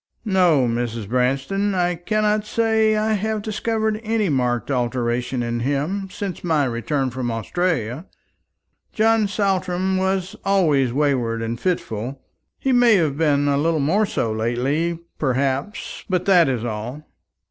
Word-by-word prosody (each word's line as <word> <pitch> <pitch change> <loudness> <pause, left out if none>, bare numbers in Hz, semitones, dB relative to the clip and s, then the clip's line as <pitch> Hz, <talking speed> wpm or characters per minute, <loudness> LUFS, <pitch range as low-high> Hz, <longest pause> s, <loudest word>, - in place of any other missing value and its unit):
"No, 180 - +3
Mrs. 115 -2 -2
Branston, 135 - 0
I 180 -1 +1
cannot 210 +4 0
say 220 0 +2
that 215 0 +1
I - - +3
have 215 +1 -1
discovered 220 0 -1
any 220 -3 0
marked 125 -3 0
alteration 120 0 -1
in 120 0 -2
him 145 +10 -1
since 190 -2 -5
my 160 -5 +2
return 130 +2 -1
from 125 -1 -3
Australia. 130 - -2 0.9
John 220 -1 +3
Saltram 190 -2 0
was 190 0 -1
always 155 -10 +2
wayward 125 -5 0
and 115 +1 -3
fitful. 130 - -2 0.4
He 270 - -1
may 245 -3 +5
have 155 -7 +1
been 145 -2 +2
a 140 -1 +2
little 160 +1 +1
more 195 +10 +2
so 115 - -1
lately, 130 +10 -1 0.2
perhaps, 135 +7 -2
but 185 -1 0
that 175 -6 +5
is 120 -3 -2
all." 120 +6 -5
155 Hz, 140 wpm, -22 LUFS, 125-195 Hz, 0.9 s, may